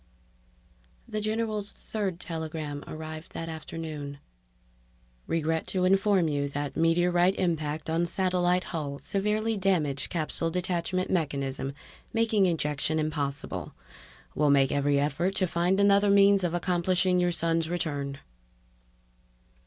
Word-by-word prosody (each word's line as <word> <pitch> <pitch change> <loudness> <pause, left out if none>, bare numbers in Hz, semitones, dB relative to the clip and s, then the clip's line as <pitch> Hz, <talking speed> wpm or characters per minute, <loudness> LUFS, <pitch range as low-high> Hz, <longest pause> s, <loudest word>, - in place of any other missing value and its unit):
The 215 - -3
general's 215 -1 -2
third 195 -5 -4
telegram 155 -4 -5
arrived 155 0 -7
that 165 0 -5
afternoon: 155 -3 -6 1.1
_Regret 160 0 0
to 185 -1 0
inform 195 -2 +3
you 145 -2 -1
that 145 0 -4
meteorite 175 +3 +3
impact 155 -4 -1
on 165 +2 +1
satellite 180 0 +1
hull 145 -4 -4
severely 210 +6 -1
damaged 175 -9 0
capsule 165 0 -1
detachment 180 +1 -1
mechanism, 140 -5 -1 0.4
making 225 -4 +3
ejection 150 -2 0
impossible. 150 -2 -3 0.6
Will 150 0 +2
make 135 -1 +4
every 145 0 +2
effort 150 +7 0
to 190 - +2
find 175 +2 +1
another 200 0 +5
means 200 -1 +5
of 175 -1 0
accomplishing 180 +1 +2
your 175 0 +2
son's 165 -1 0
return. 145 -5 -2
170 Hz, 115 wpm, -28 LUFS, 150-185 Hz, 1.1 s, another